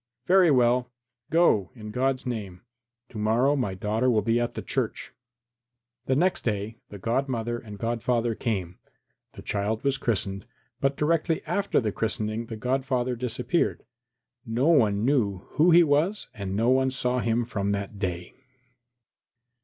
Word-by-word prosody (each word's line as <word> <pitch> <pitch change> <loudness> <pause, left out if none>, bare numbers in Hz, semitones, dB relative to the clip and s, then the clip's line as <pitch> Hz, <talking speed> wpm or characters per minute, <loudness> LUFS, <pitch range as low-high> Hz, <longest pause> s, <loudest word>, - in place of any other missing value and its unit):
"Very 185 0 +5
well; 125 -2 +3 0.4
go, 155 - +3
in 105 -3 -8
God's 130 +3 0
name. 100 -7 -5 0.5
To 110 - -7
morrow 120 +7 +2
my 120 -9 -1
daughter 110 +6 0
will 110 -4 +2
be 115 +2 +2
at 120 - -1
the - - -6
church." - - -3 0.9
The 130 - +2
next 180 +6 +1
day 110 0 -2
the 105 - -9
godmother 120 +1 -1
and 105 -3 -10
godfather 115 +1 0
came; 95 -7 -3 0.5
the - - -11
child 105 +2 -2
was 140 -1 +1
christened, 100 -4 -2 0.3
but 135 0 0
directly 165 +1 +1
after 200 0 +1
the 110 -4 -1
christening 110 +1 -2
the 115 - -6
godfather 130 +1 -1
disappeared. 125 +7 -1 0.6
No 125 +5 +1
one 110 -9 +3
knew 105 -9 +1
who 160 +4 +4
he 175 0 +7
was 160 +7 +1
and 100 -2 -4
no 115 +4 +2
one 130 0 +3
saw 125 -1 -1
him 115 0 0
from 100 -3 -2
that 100 0 -4
day. 90 -3 -3
120 Hz, 150 wpm, -26 LUFS, 105-135 Hz, 0.9 s, he